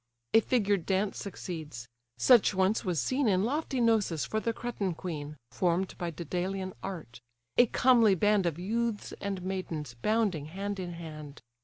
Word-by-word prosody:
A 225 Hz, -, +8 dB
figured 205 Hz, -6 st, +1 dB
dance 195 Hz, +1 st, 0 dB
succeeds; 160 Hz, -11 st, -6 dB, 0.3 s
such 240 Hz, -5 st, +5 dB
once 190 Hz, +3 st, +2 dB
was 180 Hz, -5 st, 0 dB
seen 260 Hz, -, +1 dB
In 190 Hz, -2 st, +3 dB
lofty 270 Hz, +2 st, -1 dB
Gnossus 220 Hz, -9 st, +2 dB
for 215 Hz, -, -1 dB
the 230 Hz, -, -1 dB
Cretan 215 Hz, -6 st, -3 dB
queen, 150 Hz, -4 st, -6 dB
Form'd 180 Hz, +1 st, 0 dB
by 175 Hz, -, -2 dB
Daedalean 180 Hz, +3 st, -3 dB
art; 160 Hz, -12 st, -7 dB, 0.3 s
a 245 Hz, -, +6 dB
comely 230 Hz, -5 st, +5 dB
band 205 Hz, 0 st, +3 dB
Of 165 Hz, -2 st, -2 dB
youths 220 Hz, +4 st, -2 dB
and 195 Hz, -2 st, -3 dB
maidens, 170 Hz, -8 st, -4 dB
bounding 195 Hz, -, 0 dB
hand 195 Hz, +4 st, -4 dB
in 175 Hz, -2 st, -4 dB
hand. 155 Hz, -5 st, -9 dB
190 Hz, 155 wpm, -30 LUFS, 170-215 Hz, 0.3 s, A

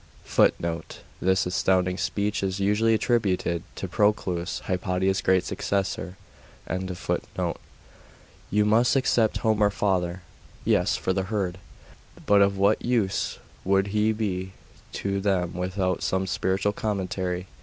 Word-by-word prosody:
'[Footnote: 85 Hz, -2 st, 0 dB, 0.2 s
This 95 Hz, +1 st, +2 dB
astounding 90 Hz, 0 st, +1 dB
speech 100 Hz, +4 st, -1 dB
is 95 Hz, 0 st, -2 dB
usually 105 Hz, +3 st, +3 dB
attributed 95 Hz, -7 st, +1 dB
to 95 Hz, -, -4 dB
Proclus, 95 Hz, -3 st, 0 dB
Hypatia's 95 Hz, +1 st, 0 dB
'great' 95 Hz, -1 st, +3 dB
successor.] 95 Hz, -2 st, -2 dB, 0.5 s
'You 95 Hz, +2 st, -4 dB
must 115 Hz, +5 st, +4 dB
except 120 Hz, -4 st, +2 dB
Homer, 110 Hz, -2 st, +2 dB
father.' 90 Hz, -3 st, -1 dB, 0.4 s
'Yes, -, -, +2 dB
for 95 Hz, -, -1 dB
the 95 Hz, 0 st, -1 dB
herd.... 95 Hz, -4 st, -2 dB, 0.7 s
But 100 Hz, 0 st, +5 dB
of 100 Hz, 0 st, +3 dB
what 100 Hz, +2 st, +3 dB
use 115 Hz, -6 st, 0 dB, 0.3 s
would 95 Hz, +1 st, +2 dB
he 105 Hz, +1 st, +3 dB
be 95 Hz, -4 st, -3 dB, 0.4 s
to 100 Hz, 0 st, -2 dB
them 95 Hz, -3 st, 0 dB
without 90 Hz, +1 st, -1 dB
some 95 Hz, 0 st, 0 dB
spiritual 95 Hz, +2 st, 0 dB
commentary? 95 Hz, -3 st, -2 dB
95 Hz, 115 wpm, -26 LUFS, 90-105 Hz, 0.7 s, But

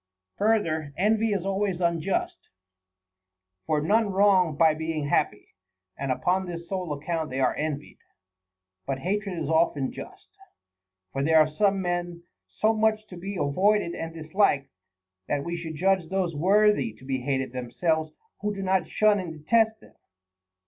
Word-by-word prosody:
5. 205 Hz, -, +2 dB
Further, 160 Hz, -10 st, +1 dB
envy 215 Hz, +3 st, +2 dB
is 195 Hz, -3 st, -1 dB
always 195 Hz, -2 st, -1 dB
unjust; 195 Hz, -, -1 dB, 1.2 s
for 155 Hz, -, +2 dB
none 210 Hz, +7 st, +2 dB
wrong 190 Hz, -5 st, +3 dB
by 160 Hz, -1 st, +5 dB
being 160 Hz, -1 st, -3 dB
happy, -, -, 0 dB, 0.5 s
and 135 Hz, -1 st, -3 dB
upon 185 Hz, +8 st, 0 dB
this 170 Hz, -1 st, -7 dB
sole 185 Hz, -4 st, -3 dB
account 160 Hz, +2 st, -3 dB
they 130 Hz, -, -3 dB
are 130 Hz, -2 st, +2 dB
envied. 150 Hz, -2 st, -4 dB, 0.9 s
But 135 Hz, -, -1 dB
hatred 195 Hz, +4 st, -2 dB
is 160 Hz, -3 st, -3 dB
often 160 Hz, -4 st, +1 dB
just; 385 Hz, +2 st, -11 dB, 0.8 s
for 135 Hz, -, -1 dB
there 160 Hz, +2 st, +4 dB
are 155 Hz, -1 st, +6 dB
some 195 Hz, +4 st, +1 dB
men 175 Hz, -1 st, -3 dB, 0.3 s
so 215 Hz, -, +1 dB
much 215 Hz, 0 st, +1 dB
to 180 Hz, -, -9 dB
be 195 Hz, +3 st, -6 dB
avoided 185 Hz, +4 st, +1 dB
and 165 Hz, 0 st, -5 dB
disliked, 160 Hz, -3 st, 0 dB, 0.6 s
that 145 Hz, -1 st, -1 dB
we 170 Hz, +2 st, -3 dB
should 165 Hz, -2 st, -6 dB
judge 185 Hz, 0 st, +1 dB
those 185 Hz, -4 st, -1 dB
worthy 190 Hz, -, +3 dB
to 110 Hz, +4 st, -17 dB
be 130 Hz, -1 st, -2 dB
hated 130 Hz, -1 st, -1 dB
themselves 155 Hz, +6 st, -1 dB, 0.3 s
who 210 Hz, 0 st, -2 dB
do 195 Hz, -, -4 dB
not 190 Hz, -1 st, +1 dB
shun 215 Hz, -1 st, +3 dB
and 180 Hz, -3 st, -5 dB
detest 220 Hz, +8 st, +1 dB
them. -, -, -18 dB
170 Hz, 155 wpm, -26 LUFS, 155-200 Hz, 1.2 s, are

